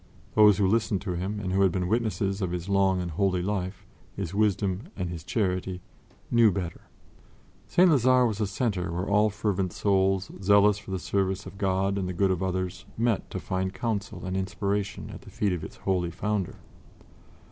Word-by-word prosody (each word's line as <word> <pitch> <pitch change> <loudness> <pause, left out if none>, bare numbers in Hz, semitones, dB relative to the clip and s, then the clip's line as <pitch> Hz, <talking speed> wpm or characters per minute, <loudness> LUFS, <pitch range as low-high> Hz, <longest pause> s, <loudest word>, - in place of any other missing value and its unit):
Those 105 -2 +6
who 100 - +2
listened 105 0 +2
to 100 - -3
him 95 +4 -3
and 95 -2 -3
who 95 - +2
had 95 -2 +4
been 90 0 -1
witnesses 105 -2 0
of 95 - 0
his 90 +1 -4
long 95 -1 +3
and 85 -1 -4
holy 90 +1 +1
life, 95 0 -3 0.3
his 95 -3 -4
wisdom 100 - 0
and 90 -2 -3
his 85 -3 -6
charity, 95 -2 -1 0.5
knew 115 -3 +6
better. 90 -3 -4 0.9
St. 180 +1 +5
Lazare 130 -5 +5
was 110 -1 -3
a 105 - +1
center 95 -4 -1
where 90 +3 -2
all 105 +1 +3
fervent 100 -4 -1
souls 95 -1 +1
zealous 100 +1 +5
for 105 - -13
the 95 - -1
service 95 +1 -1
of 100 - -10
God 95 0 +1
and 90 -1 -2
the - - -3
good 95 +2 +2
of 90 -1 -1
others 95 -1 -2
met 115 -2 0
to - - -4
find 95 0 -2
counsel 105 -5 -3
and 95 0 -3
inspiration 100 +1 -2
at - - -9
the - - -13
feet 100 -3 0
of 85 -3 -4
its - - -8
holy 90 -3 -1
founder. 95 +2 -2
95 Hz, 190 wpm, -27 LUFS, 95-105 Hz, 0.9 s, Those